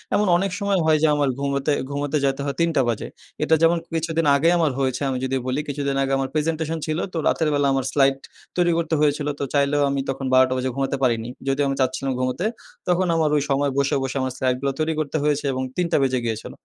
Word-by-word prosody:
এমন 210 Hz, -, +2 dB
অনেক 195 Hz, +1 st, -1 dB
সময় 200 Hz, -2 st, +1 dB
হয় 155 Hz, -1 st, +4 dB
যে 160 Hz, -, +6 dB
আমার 145 Hz, -2 st, +1 dB
ঘুমোতে 140 Hz, +1 st, 0 dB, 0.2 s
ঘুমাতে 145 Hz, +1 st, -1 dB
যেতে 135 Hz, 0 st, 0 dB
হয় 140 Hz, -, -2 dB
৩ঃ০০ 170 Hz, -, +3 dB
টা 135 Hz, -, +4 dB
বাজে। 115 Hz, -, -2 dB, 0.4 s
এটা 160 Hz, -, +4 dB
যেমন 165 Hz, +1 st, +4 dB, 0.2 s
কিছুদিন 165 Hz, 0 st, 0 dB
আগেই 165 Hz, +4 st, +3 dB
আমার 160 Hz, -4 st, +2 dB
হয়েছে 130 Hz, -1 st, -1 dB
আমি 130 Hz, -, -1 dB
যদি 130 Hz, 0 st, -1 dB
বলি, 130 Hz, +3 st, 0 dB
কিছুদিন 140 Hz, -1 st, -2 dB
আগে 135 Hz, -, -2 dB
আমার 135 Hz, -1 st, -2 dB
প্রেজেন্টেশন 160 Hz, +1 st, -1 dB
ছিল 155 Hz, 0 st, -2 dB, 0.2 s
তো -, -, -3 dB
রাতের 160 Hz, -2 st, +1 dB
বেলা 145 Hz, -1 st, +2 dB
আমার 135 Hz, -1 st, 0 dB
স্লাইড 135 Hz, -1 st, +3 dB, 0.4 s
তৈরি 175 Hz, -1 st, +3 dB
করতে 165 Hz, -1 st, 0 dB
হয়েছিল। 145 Hz, 0 st, +1 dB
তো -, -, -1 dB
চাইলেও 145 Hz, 0 st, +2 dB
আমি 140 Hz, 0 st, -1 dB
তখন 135 Hz, 0 st, -3 dB
১২ঃ০০ 130 Hz, 0 st, +7 dB
টা -, -, 0 dB
বাজে 130 Hz, 0 st, -1 dB
ঘুমাতে 135 Hz, 0 st, -1 dB
পারিনি। 115 Hz, -2 st, +1 dB, 0.2 s
যদিও 135 Hz, +1 st, +1 dB
আমি 135 Hz, -, -1 dB
চাচ্ছিলাম 130 Hz, +1 st, 0 dB
ঘুমোতে 130 Hz, +9 st, -1 dB, 0.4 s
তখন 180 Hz, +1 st, +2 dB
আমার 160 Hz, -2 st, +2 dB
ওই 145 Hz, -, +1 dB
সময় 140 Hz, 0 st, +1 dB
বসে, 140 Hz, 0 st, +2 dB
বসে 135 Hz, +1 st, -4 dB
আমার 130 Hz, -1 st, -2 dB
স্লাইডগুলা 130 Hz, +1 st, 0 dB
তৈরি 160 Hz, +1 st, +1 dB
করতে 155 Hz, 0 st, -1 dB
হয়েছে 150 Hz, -1 st, 0 dB
এবং 130 Hz, 0 st, -2 dB
৩ঃ০০ 180 Hz, -, +1 dB
টা -, -, +4 dB
বেজে 130 Hz, -1 st, +1 dB
গিয়েছিল। 110 Hz, -2 st, -4 dB
140 Hz, 230 wpm, -22 LUFS, 135-160 Hz, 0.4 s, ১২ঃ০০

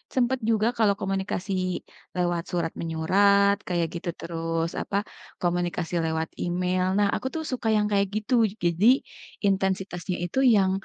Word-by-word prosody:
sempet 255 Hz, +1 st, +2 dB
juga 225 Hz, -1 st, +2 dB
kalau 210 Hz, -3 st, +4 dB
komunikasi 195 Hz, 0 st, -2 dB, 0.6 s
lewat 175 Hz, -1 st, 0 dB
surat-menyurat 180 Hz, +4 st, +2 dB
kayak 170 Hz, -2 st, 0 dB
gitu, 170 Hz, +1 st, -4 dB
terus 165 Hz, 0 st, -2 dB
apa, 200 Hz, -, -2 dB, 0.4 s
komunikasi 175 Hz, -1 st, -1 dB
lewat 160 Hz, 0 st, -1 dB
email. 180 Hz, +1 st, 0 dB
Nah, 205 Hz, -, +4 dB
aku 260 Hz, -, -3 dB
tuh 320 Hz, -, -2 dB
suka 245 Hz, -3 st, -1 dB
yang 210 Hz, -1 st, +2 dB
kayak 200 Hz, -1 st, +3 dB
gitu, 215 Hz, +4 st, -2 dB, 0.3 s
jadi 175 Hz, +5 st, +2 dB, 0.6 s
intensitasnya 190 Hz, -2 st, 0 dB
itu 175 Hz, +10 st, -1 dB
yang 200 Hz, -6 st, +5 dB
185 Hz, 135 wpm, -26 LUFS, 175-205 Hz, 0.6 s, yang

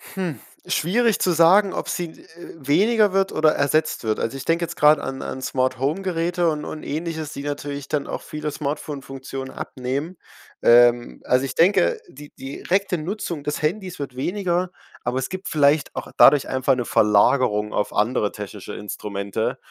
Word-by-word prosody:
Hm, 175 Hz, -, -3 dB, 0.3 s
schwierig 225 Hz, +6 st, +1 dB
zu 180 Hz, -, +2 dB
sagen, 185 Hz, +4 st, +5 dB
ob -, -, -4 dB
sie, 175 Hz, -, -2 dB
äh, 160 Hz, +1 st, -14 dB
weniger 205 Hz, -, +3 dB
wird 195 Hz, 0 st, +1 dB
oder 155 Hz, 0 st, +4 dB
ersetzt 145 Hz, -3 st, 0 dB
wird. 110 Hz, -1 st, 0 dB
Also, 135 Hz, +4 st, -2 dB
ich -, -, -8 dB
denke 170 Hz, +1 st, +1 dB
jetzt 170 Hz, -, -5 dB
grad 150 Hz, 0 st, +6 dB
an 135 Hz, 0 st, -5 dB
an 130 Hz, -, -5 dB
Smarthome-Geräte 165 Hz, +7 st, 0 dB
und 150 Hz, -1 st, -3 dB
und 155 Hz, -, -7 dB
Ähnliches, 160 Hz, 0 st, -4 dB
die 140 Hz, -, -6 dB
natürlich 145 Hz, -1 st, -5 dB
dann 150 Hz, -2 st, -1 dB
auch -, -, -4 dB
viele 150 Hz, 0 st, -5 dB
Smartphone-Funktionen 135 Hz, -2 st, -5 dB
abnehmen. 135 Hz, +7 st, -4 dB, 0.5 s
Ähm, 120 Hz, -, +4 dB
also 125 Hz, +1 st, +2 dB
ich -, -, -4 dB
denke, 165 Hz, -, +3 dB
die 145 Hz, +2 st, -13 dB
die 135 Hz, +1 st, -8 dB
direkte 190 Hz, -1 st, +1 dB
Nutzung 170 Hz, -2 st, -4 dB
des 150 Hz, +1 st, -3 dB
Handys 185 Hz, +3 st, -2 dB
wird 135 Hz, -3 st, -6 dB
weniger, 180 Hz, +4 st, -1 dB, 0.3 s
aber 125 Hz, +2 st, -1 dB
es 130 Hz, -, -2 dB
gibt 185 Hz, +1 st, -6 dB
vielleicht 145 Hz, -1 st, +2 dB
auch -, -, -5 dB
dadurch 145 Hz, -1 st, +6 dB
einfach 130 Hz, +1 st, +2 dB
'ne 125 Hz, -, -2 dB
Verlagerung 105 Hz, 0 st, +3 dB
auf 105 Hz, -, -1 dB
andere 105 Hz, -1 st, +1 dB
technische 105 Hz, -4 st, -8 dB
Instrumente. 105 Hz, +4 st, -4 dB
145 Hz, 165 wpm, -22 LUFS, 130-170 Hz, 0.5 s, grad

